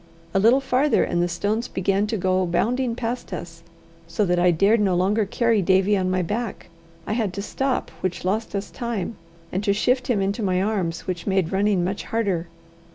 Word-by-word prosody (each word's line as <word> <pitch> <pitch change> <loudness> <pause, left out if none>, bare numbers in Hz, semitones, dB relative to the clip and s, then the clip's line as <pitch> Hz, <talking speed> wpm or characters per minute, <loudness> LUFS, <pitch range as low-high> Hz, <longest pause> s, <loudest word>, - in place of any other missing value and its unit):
A 195 - +3
little 235 +7 +5
farther, 270 +2 +2
and 175 - 0
the 175 - +2
stones 205 +7 -1
began 195 +2 0
to 220 - -1
go 185 0 +1
bounding 240 +7 0
past 240 -1 -4
us, 165 -2 -7 0.5
so 210 - 0
that 180 -1 +1
I 180 +1 +4
dared 200 +7 +3
no 195 -3 +2
longer 200 +4 +2
carry 230 0 +2
Davie 190 +2 +3
on 185 -2 0
my 185 0 +1
back. 220 +5 -4 0.4
I - - -2
had 215 -5 -1
to 200 - -4
stop, 265 +4 -2
which 180 -1 -3
lost 210 +3 -1
us 200 0 -4
time, 230 -4 -3 0.4
and 190 +3 -2
to 200 -1 +2
shift 250 +5 +1
him 235 -5 +1
into 200 +3 -1
my 185 -3 +1
arms, 190 -5 -1
which 180 -3 -4
made 190 -4 +1
running 195 -1 +2
much 190 +3 -3
harder. 195 -7 -1
200 Hz, 200 wpm, -23 LUFS, 185-225 Hz, 0.5 s, little